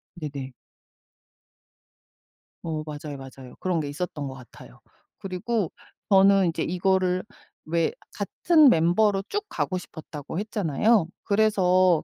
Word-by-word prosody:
네네. 140 Hz, -5 st, -6 dB, 2.1 s
어. 155 Hz, -2 st, -3 dB
맞아요, 150 Hz, -1 st, -7 dB
맞아요. 135 Hz, -1 st, -11 dB
그런 180 Hz, -3 st, 0 dB
게 145 Hz, -, -3 dB
있었던 150 Hz, -1 st, -4 dB
것 135 Hz, -, -6 dB
같아요. 125 Hz, -2 st, -14 dB, 0.4 s
그리고 195 Hz, +1 st, -2 dB, 0.4 s
저는 195 Hz, -1 st, +6 dB
이제 160 Hz, -, -2 dB
이거를 185 Hz, +1 st, +1 dB, 0.4 s
왜 165 Hz, +1 st, +1 dB, 0.2 s
같은 310 Hz, -5 st, +4 dB
멤버로 195 Hz, +2 st, +3 dB
쭉 415 Hz, +1 st, -2 dB
가고 185 Hz, -, -2 dB
싶었다고 160 Hz, -2 st, -7 dB
했잖아요. 210 Hz, -1 st, +2 dB, 0.2 s
그래서 185 Hz, -5 st, +3 dB
180 Hz, 245 characters per minute, -25 LUFS, 155-195 Hz, 2.1 s, 저는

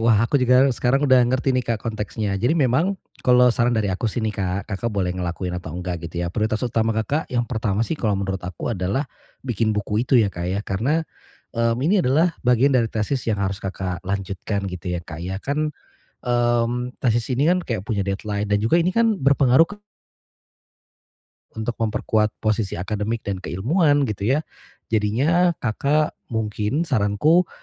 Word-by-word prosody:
Wah, 115 Hz, -1 st, +4 dB
aku 140 Hz, +3 st, +1 dB
juga 125 Hz, +1 st, +5 dB
sekarang 135 Hz, +4 st, +1 dB
udah 130 Hz, -2 st, +6 dB
ngerti 130 Hz, +1 st, +1 dB
nih 125 Hz, -1 st, 0 dB
Kak 115 Hz, -2 st, -1 dB
konteksnya. 110 Hz, -1 st, -3 dB
Jadi 150 Hz, +8 st, +2 dB
memang 155 Hz, +8 st, +2 dB, 0.2 s
kalau 125 Hz, 0 st, +5 dB
saran 120 Hz, 0 st, +1 dB
dari 105 Hz, -3 st, +1 dB
aku 110 Hz, +5 st, -1 dB
sih 110 Hz, +2 st, -3 dB
nih 110 Hz, -, 0 dB
Kak, 95 Hz, +1 st, -3 dB
Kakak 100 Hz, +4 st, -2 dB
boleh 90 Hz, -3 st, 0 dB
ngelakuin 90 Hz, 0 st, -3 dB
atau 80 Hz, -2 st, -8 dB
enggak 90 Hz, -1 st, -4 dB
gitu 85 Hz, +1 st, -3 dB
ya. 85 Hz, -, -4 dB
Prioritas 110 Hz, +2 st, -1 dB
utama 115 Hz, -2 st, 0 dB
Kakak 140 Hz, +8 st, -1 dB
yang 120 Hz, -1 st, 0 dB
pertama 110 Hz, -2 st, -1 dB
sih 165 Hz, -, -2 dB
kalau 105 Hz, -4 st, +1 dB
menurut 95 Hz, -1 st, -2 dB
aku 90 Hz, +6 st, -4 dB
adalah 100 Hz, +9 st, -1 dB, 0.4 s
bikin 115 Hz, -3 st, 0 dB
buku 105 Hz, +2 st, 0 dB
itu 130 Hz, -, +4 dB
ya 105 Hz, -3 st, +3 dB
Kak 85 Hz, 0 st, -4 dB
ya, 100 Hz, +2 st, -1 dB
karena, 135 Hz, +12 st, 0 dB, 0.5 s
eee, 115 Hz, 0 st, +2 dB
ini 195 Hz, +4 st, +4 dB
adalah 160 Hz, +6 st, +3 dB
bagian 125 Hz, +3 st, +4 dB
dari 115 Hz, -3 st, +3 dB
tesis 110 Hz, +5 st, -1 dB
yang 105 Hz, -, 0 dB
harus 95 Hz, 0 st, -1 dB
Kakak 95 Hz, -2 st, -4 dB
lanjutkan 100 Hz, +1 st, -3 dB
gitu 90 Hz, 0 st, -5 dB
ya 85 Hz, -, -2 dB
Kak 80 Hz, 0 st, -8 dB
ya. 95 Hz, +2 st, -3 dB
Kan, 150 Hz, +2 st, -1 dB, 0.6 s
mmm, 120 Hz, 0 st, 0 dB
tesis 120 Hz, -2 st, +1 dB
ini 145 Hz, +6 st, +2 dB
kan 180 Hz, 0 st, +2 dB
kayak 115 Hz, -6 st, -3 dB
punya 105 Hz, -3 st, 0 dB
deadline 100 Hz, +1 st, -2 dB
dan 105 Hz, 0 st, +2 dB
juga 115 Hz, +10 st, +3 dB
ini 180 Hz, +2 st, +1 dB
kan 230 Hz, -3 st, +3 dB
berpengaruh 140 Hz, +1 st, +4 dB
ke 205 Hz, +3 st, -11 dB, 1.8 s
Untuk 110 Hz, +1 st, -3 dB
memperkuat 110 Hz, 0 st, +1 dB, 0.2 s
posisi 110 Hz, -2 st, 0 dB
akademik 105 Hz, +5 st, -3 dB
dan 95 Hz, -2 st, -3 dB
keilmuan 145 Hz, -, +2 dB
gitu 105 Hz, -2 st, -2 dB
ya. -, -, +1 dB, 0.5 s
Jadinya 145 Hz, +12 st, +2 dB
Kakak 145 Hz, +7 st, +1 dB, 0.2 s
mungkin 110 Hz, +6 st, -1 dB
saranku 140 Hz, -, +2 dB
115 Hz, 180 wpm, -22 LUFS, 100-130 Hz, 1.8 s, udah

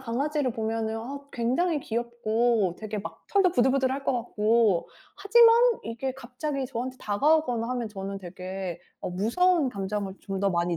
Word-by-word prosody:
강아지를 265 Hz, +2 st, -1 dB
보면은 225 Hz, 0 st, -2 dB
아 270 Hz, +5 st, -6 dB
굉장히 285 Hz, +7 st, 0 dB
귀엽고 235 Hz, -4 st, 0 dB
되게 215 Hz, -1 st, -4 dB
막 200 Hz, -, -8 dB
털도 385 Hz, -3 st, +4 dB
부들부들할 265 Hz, +1 st, +2 dB
것 -, -, +2 dB
같고. 225 Hz, -4 st, +2 dB, 0.3 s
하지만 455 Hz, +3 st, +6 dB, 0.3 s
이게 235 Hz, +3 st, -3 dB
갑자기 265 Hz, +2 st, -4 dB
저한테 255 Hz, 0 st, -4 dB
다가오거나 245 Hz, +1 st, +1 dB
하면 245 Hz, -3 st, -2 dB
저는 195 Hz, -1 st, -6 dB
되게 185 Hz, -1 st, -6 dB, 0.2 s
어 -, -, -4 dB
무서운 275 Hz, -, +2 dB
감정을 195 Hz, -1 st, -3 dB
좀 195 Hz, -, -5 dB
더 200 Hz, -, +3 dB
많이 170 Hz, -1 st, 0 dB
235 Hz, 335 characters per minute, -27 LUFS, 210-270 Hz, 0.3 s, 하지만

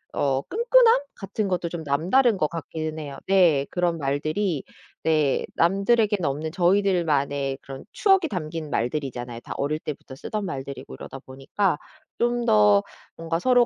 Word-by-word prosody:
어 135 Hz, -1 st, +1 dB
끈끈함 470 Hz, -, +4 dB
같은 200 Hz, +1 st, -3 dB
것도 180 Hz, -2 st, -1 dB
좀 170 Hz, -1 st, -5 dB
남다른 190 Hz, -, +2 dB
것 155 Hz, -, +1 dB
같기는 160 Hz, -1 st, -5 dB
해요. 140 Hz, -2 st, -7 dB
네. 175 Hz, -8 st, +4 dB
그런 175 Hz, -2 st, 0 dB
말들이 155 Hz, +4 st, -1 dB, 0.4 s
네. 155 Hz, -4 st, +2 dB
남들에겐 200 Hz, +2 st, +2 dB
없는 150 Hz, +3 st, -2 dB
저희들만의 165 Hz, -7 st, +1 dB
그런 135 Hz, -1 st, -9 dB
추억이 385 Hz, -4 st, +3 dB
담긴 160 Hz, -3 st, -4 dB
말들이잖아요. 125 Hz, -2 st, -3 dB
다 -, -, -7 dB
어릴 150 Hz, +2 st, -1 dB
때부터 145 Hz, -3 st, -7 dB
쓰던 210 Hz, +9 st, -4 dB
말들이고 140 Hz, -4 st, -6 dB
이러다 135 Hz, -, -8 dB
보니까 135 Hz, +7 st, -2 dB, 0.4 s
좀 240 Hz, 0 st, +1 dB
더 105 Hz, -1 st, +5 dB, 0.3 s
뭔가 165 Hz, 0 st, -2 dB
서로 245 Hz, +4 st, +4 dB
160 Hz, 320 characters per minute, -24 LUFS, 140-195 Hz, 0.4 s, 더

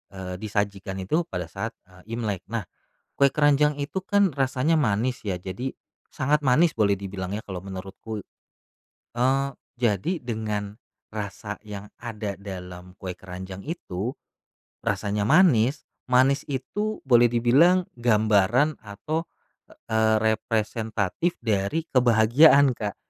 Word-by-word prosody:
eee, 90 Hz, -1 st, -5 dB
disajikan 100 Hz, -2 st, -2 dB
itu 160 Hz, -, 0 dB
pada 90 Hz, -2 st, -4 dB
saat, -, -, -4 dB
eee, 95 Hz, +5 st, -9 dB
Imlek. 105 Hz, -6 st, -2 dB
Nah, 115 Hz, -1 st, -3 dB, 0.5 s
kue 140 Hz, -1 st, +4 dB
keranjang 145 Hz, 0 st, +3 dB
itu 150 Hz, +7 st, -3 dB
kan 200 Hz, 0 st, +3 dB
rasanya 135 Hz, +4 st, +2 dB
manis 125 Hz, -3 st, 0 dB
ya, 95 Hz, -4 st, -2 dB
jadi 100 Hz, +9 st, -4 dB, 0.4 s
sangat 150 Hz, +3 st, +1 dB
manis 150 Hz, +6 st, +4 dB
boleh 100 Hz, -3 st, +3 dB
dibilang 95 Hz, -1 st, -5 dB
ya 105 Hz, -, -2 dB
kalau 95 Hz, -3 st, -7 dB
menurutku, 95 Hz, +3 st, -7 dB, 0.9 s
eee, 130 Hz, +3 st, +2 dB, 0.3 s
jadi 120 Hz, -, 0 dB
dengan 105 Hz, -3 st, -3 dB, 0.3 s
rasa 105 Hz, 0 st, -5 dB
yang 105 Hz, 0 st, -7 dB
ada 105 Hz, -4 st, -5 dB
dalam 90 Hz, -2 st, -9 dB
kue 95 Hz, -2 st, -5 dB
keranjang 95 Hz, +1 st, -8 dB
itu, 125 Hz, -, -4 dB, 0.7 s
rasanya 100 Hz, 0 st, 0 dB
manis, 140 Hz, -, +4 dB, 0.3 s
manis 135 Hz, +3 st, +4 dB
itu 205 Hz, +11 st, -3 dB
boleh 120 Hz, -2 st, +6 dB
dibilang 140 Hz, +11 st, +4 dB
gambaran 110 Hz, +4 st, +3 dB
atau, 130 Hz, +11 st, -4 dB, 0.6 s
eee, 110 Hz, 0 st, +3 dB
representatif 110 Hz, -, 0 dB
dari 110 Hz, +8 st, 0 dB
kebahagiaan, 130 Hz, +4 st, +6 dB
Kak, 105 Hz, -3 st, -3 dB
110 Hz, 120 wpm, -25 LUFS, 100-135 Hz, 0.9 s, boleh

